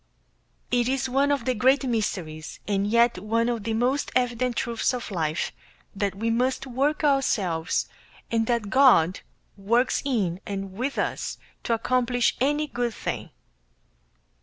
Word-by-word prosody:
It 245 0 +2
is 265 -1 0
one 275 +3 +2
of 285 - 0
the 255 - +2
great 260 +5 +3
mysteries 185 -10 -3
and 200 -1 +1
yet 235 +1 +3
one 225 +4 0
of 230 -4 -3
the 225 -1 -1
most 255 +5 0
evident 250 -1 +1
truths 235 +1 0
of 240 -3 -6
life, 160 -3 -1 0.4
that 200 -1 -1
we 225 +3 -1
must 255 +3 0
work 275 +5 0
ourselves, 205 - +1 0.4
and 225 -1 +1
that 235 -4 0
God 240 -10 +5 0.4
works 235 +6 +1
in 205 -10 -1
and 195 -1 -5
with 255 +7 -3
us, - - -2 0.3
to 230 - +2
accomplish 245 +1 +1
any 295 +3 +2
good 240 -5 -3
thing. - - -4
235 Hz, 145 wpm, -25 LUFS, 205-255 Hz, 0.4 s, God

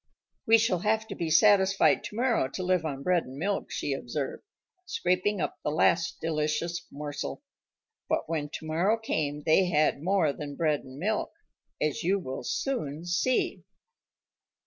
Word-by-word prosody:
"We 225 +1 +8
shall 215 -5 +1
have 220 +3 +1
to - - -5
be 170 -2 -2
satisfied 195 +3 +5
tomorrow 235 - 0
to 160 +8 -5
live 180 -2 +1
on 140 -3 -4
bread 180 0 +2
and 130 +1 -10
milk," 195 +6 -2
she 145 - -2
observed, 135 +1 -4 0.5
scraping 205 - 0
up - - -3
the - - 0
last 170 +2 +2
delicious 160 +2 -1
morsel. 145 - -5 0.7
But - - 0
when 150 -3 -2
tomorrow 165 +8 0
came 150 -9 -2
they 160 +5 +4
had 155 -4 +2
more 180 -4 +2
than 145 -1 -7
bread 155 -2 +1
and 130 0 -12
milk, 210 +7 -1 0.5
as 150 -2 0
you 190 +4 +2
will 135 -8 -5
soon 165 - -2
see. 180 +9 0
170 Hz, 150 wpm, -28 LUFS, 150-200 Hz, 0.7 s, We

